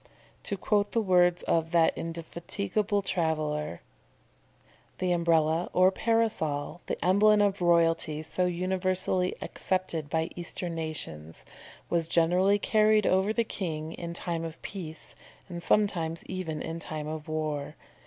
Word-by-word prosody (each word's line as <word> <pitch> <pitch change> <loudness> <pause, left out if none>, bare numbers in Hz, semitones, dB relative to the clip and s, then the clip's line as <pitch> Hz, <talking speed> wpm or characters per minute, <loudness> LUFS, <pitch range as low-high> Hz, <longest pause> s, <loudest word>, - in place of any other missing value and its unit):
To 200 - -2
quote 205 +2 +1
the 230 - +3
words 180 -4 +3
of 165 -1 +1
that 165 -1 +4
indefatigable 195 +5 -2
traveller: 155 - -1 1.2
"The 185 -1 0
Umbrella 165 -1 +2
or 185 +1 +5
Parasol, 190 -10 0
the - - -2
emblem 210 +3 +5
of 200 -2 +2
royalty 165 -3 +3
so 180 +3 -1
universally 185 +1 0
accepted 185 -5 -2
by 160 +2 -1
eastern 175 0 -3
nations, 115 - -6 0.4
was 170 -2 0
generally 180 +4 +3
carried 215 0 +3
over 190 +3 +3
the 230 +1 +1
king 160 -7 -4
in 170 0 -6
time 170 -2 -3
of 165 -1 -6
peace, 165 -5 -8 0.3
and 175 -2 -6
sometimes 170 -5 +1
even 170 -5 -4
in 165 +1 -5
time 155 -2 -5
of 155 0 -6
war. 155 -1 -3
170 Hz, 130 wpm, -28 LUFS, 160-190 Hz, 1.2 s, or